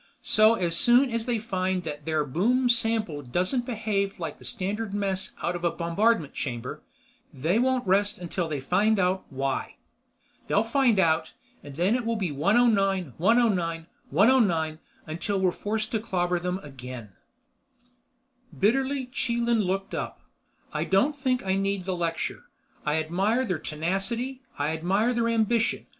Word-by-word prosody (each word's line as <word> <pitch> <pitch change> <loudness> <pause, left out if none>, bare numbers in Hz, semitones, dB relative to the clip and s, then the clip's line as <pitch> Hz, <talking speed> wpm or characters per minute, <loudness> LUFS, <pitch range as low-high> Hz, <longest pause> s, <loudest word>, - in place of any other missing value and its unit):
So 215 +1 +5
as 170 -5 0
soon 245 +7 +5
as 230 +1 -2
they 240 -2 +1
find 190 -4 -1
that 150 -2 -6
their 155 -2 0
boom 240 - +1
sample 225 -9 +1
doesn't 180 - -1
behave 210 -4 -1
like 165 - -5
the - - -14
standard 205 -1 -3
mess 195 -2 -2
out 175 - 0
of 175 - -6
a 170 - +3
bombardment 170 0 +1
chamber, 125 +2 -5 0.5
they 160 - 0
won't 260 0 +1
rest 200 +2 +2
until 175 -1 -3
they 150 -2 -2
find 200 +10 +2
out 185 0 +1
why. 135 0 -3 0.7
They'll 205 - +3
find 235 -1 +2
out. 160 -4 +2 0.3
Then 170 +9 0
it'll 230 -2 0
be 190 -7 -2
109, 195 - +2
109, 180 -5 +2 0.2
109 170 - +3 0.3
until 170 +5 -2
we're 185 -1 +2
forced 215 +4 -3
to 220 - 0
clobber 180 -4 -1
them 180 +1 -2
again." 130 -5 -9 1.5
Bitterly 265 +6 +1
Chelan 235 -2 0
looked 195 0 -2
up. - - -4 0.5
"I - - -1
don't 245 +11 +2
think 255 -5 -1
I 190 0 +1
need 195 -1 -1
the 190 -1 -1
lecture. 165 -1 -3 0.4
I 150 - +2
admire 190 +10 +1
their 180 -8 -2
tenacity. 195 - -3 0.2
I 145 +1 0
admire 190 +9 +1
their 235 -1 +1
ambition. 230 0 +1
195 Hz, 150 wpm, -26 LUFS, 170-230 Hz, 1.5 s, So